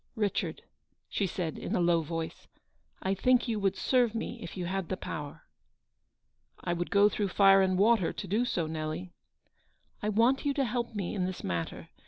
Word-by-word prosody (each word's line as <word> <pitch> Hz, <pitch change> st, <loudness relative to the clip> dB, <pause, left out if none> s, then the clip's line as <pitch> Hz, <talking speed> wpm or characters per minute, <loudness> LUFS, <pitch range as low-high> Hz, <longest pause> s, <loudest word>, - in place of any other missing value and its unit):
" -, -, -42 dB
Richard/' -, -, -3 dB, 0.5 s
she 200 Hz, -, 0 dB
said 170 Hz, -3 st, -3 dB
in -, -, -2 dB
a -, -, +2 dB
low 170 Hz, -1 st, +3 dB
voice, 165 Hz, +1 st, -5 dB, 0.3 s
" -, -, -23 dB
I 190 Hz, -, +1 dB
think 250 Hz, +6 st, +3 dB
you 225 Hz, -2 st, -1 dB
would 195 Hz, -2 st, +1 dB
serve 245 Hz, -4 st, +2 dB
me 230 Hz, +1 st, -4 dB
if -, -, -8 dB
you 180 Hz, -, -2 dB
had 190 Hz, -1 st, -2 dB
the 185 Hz, -, -2 dB
power." 150 Hz, -3 st, -6 dB, 0.6 s
" -, -, -50 dB, 0.3 s
I 175 Hz, -, -2 dB
would 175 Hz, 0 st, -2 dB
go 200 Hz, +1 st, +6 dB
through 210 Hz, -1 st, -1 dB
fire 195 Hz, 0 st, +6 dB
and 185 Hz, -1 st, +2 dB
water 210 Hz, -2 st, +4 dB
to 200 Hz, -, -6 dB
do 210 Hz, +6 st, +1 dB
so, 180 Hz, -9 st, -1 dB
Nelly." 155 Hz, +3 st, -4 dB, 0.4 s
" -, -, -41 dB
I 210 Hz, -, 0 dB
want 230 Hz, +6 st, +3 dB
you 285 Hz, -2 st, 0 dB
to 275 Hz, -2 st, +2 dB
help 235 Hz, -1 st, -2 dB
me 195 Hz, -4 st, -2 dB
in 185 Hz, -2 st, 0 dB
this 185 Hz, -, -6 dB
matter. 85 Hz, -2 st, -3 dB
195 Hz, 210 wpm, -30 LUFS, 175-225 Hz, 0.6 s, go